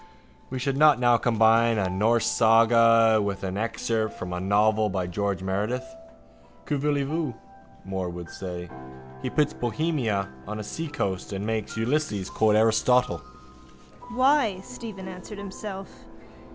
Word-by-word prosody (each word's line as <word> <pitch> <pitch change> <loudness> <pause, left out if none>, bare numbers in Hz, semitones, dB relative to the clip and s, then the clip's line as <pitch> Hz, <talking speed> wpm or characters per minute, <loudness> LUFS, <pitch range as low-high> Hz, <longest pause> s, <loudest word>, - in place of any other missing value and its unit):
We 130 - -4
should 135 +1 -1
not 150 -2 +6
now 120 -1 +4
combine 115 0 +3
a 95 -3 +1
Norse 110 +4 +1
saga 115 0 +5
with 100 -1 -3
an 95 0 -3
excerpt 110 0 -2
from 90 0 -5
a 90 - -3
novel 105 +3 +2
by 95 -2 -2
George 95 +1 -2
Meredith. 105 +6 -2 0.8
Que 150 - -1
voulez 145 0 0
vous? 150 -4 -2 0.5
Moore 95 -2 -3
would 85 0 -7
say. 90 -2 -6 0.5
He - - -3
puts 150 -1 +1
Bohemia 120 -5 -1 0.2
on 105 +1 -4
the 105 - -5
seacoast 105 - -4
and 100 +1 -4
makes 110 -1 -3
Ulysses 115 -5 -1
quote 110 -1 +3
Aristotle. 115 +3 +3 0.9
—Why? 255 -6 +3
Stephen 220 -6 -8
answered 185 +3 -9
himself. 195 -1 -7
115 Hz, 140 wpm, -26 LUFS, 100-145 Hz, 0.9 s, not